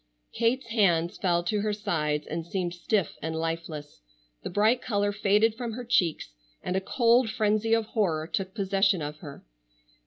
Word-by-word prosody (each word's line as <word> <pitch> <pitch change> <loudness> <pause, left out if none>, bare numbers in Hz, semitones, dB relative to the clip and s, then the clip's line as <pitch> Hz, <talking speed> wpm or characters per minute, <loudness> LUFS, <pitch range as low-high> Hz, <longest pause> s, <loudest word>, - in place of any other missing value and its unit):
Kate's 240 +3 +1
hands 195 -6 +1
fell 175 -2 +1
to 205 +4 0
her 215 0 0
sides, 155 -8 -1
and 165 +1 -4
seemed 175 0 -3
stiff 180 0 -1
and 160 0 -3
lifeless. 160 - -5 0.4
The - - -5
bright 215 +6 +2
color 205 -3 0
faded 210 +2 +2
from 235 0 -5
her 245 +2 -6
cheeks, 180 - +1 0.3
and 180 - -2
a 190 - +1
cold 235 +2 +3
frenzy 215 +1 +2
of 225 -1 0
horror 180 -9 0
took 190 +2 -4
possession 195 -3 +2
of 150 +1 -5
her. 145 - -11
195 Hz, 165 wpm, -27 LUFS, 165-220 Hz, 0.4 s, cold